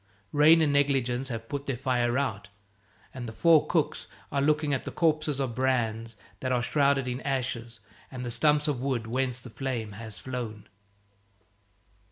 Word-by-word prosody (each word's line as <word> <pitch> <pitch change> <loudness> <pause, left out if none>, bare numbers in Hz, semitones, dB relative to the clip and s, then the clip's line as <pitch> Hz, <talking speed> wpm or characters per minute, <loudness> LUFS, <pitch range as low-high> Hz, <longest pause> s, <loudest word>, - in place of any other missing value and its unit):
Rain 155 +3 +6
and 145 -2 +2
negligence 135 -3 +2
have 115 -2 -5
put 140 +1 -5
their 135 -3 -1
fire 125 -1 +1
out, 105 -8 -2 0.7
and 125 -2 -6
the - - -6
four 160 +6 +4
cooks - - 0 0.2
are 140 - +1
looking 150 0 +2
at 135 - -1
the - - -5
corpses 155 -4 +1
of 130 -4 -1
brands 115 -3 -1 0.2
that 130 - -2
are 125 -1 +1
shrouded 140 0 +2
in 125 +1 -3
ashes 120 -4 -3 0.3
and 125 -2 -6
the 120 - -3
stumps 150 +4 +3
of 140 -5 -1
wood 130 -4 -1
whence 125 +1 -1
the 125 -1 -11
flame 120 -4 -3
has 110 -1 -8
flown. 120 -4 -6
130 Hz, 170 wpm, -28 LUFS, 120-140 Hz, 0.7 s, Rain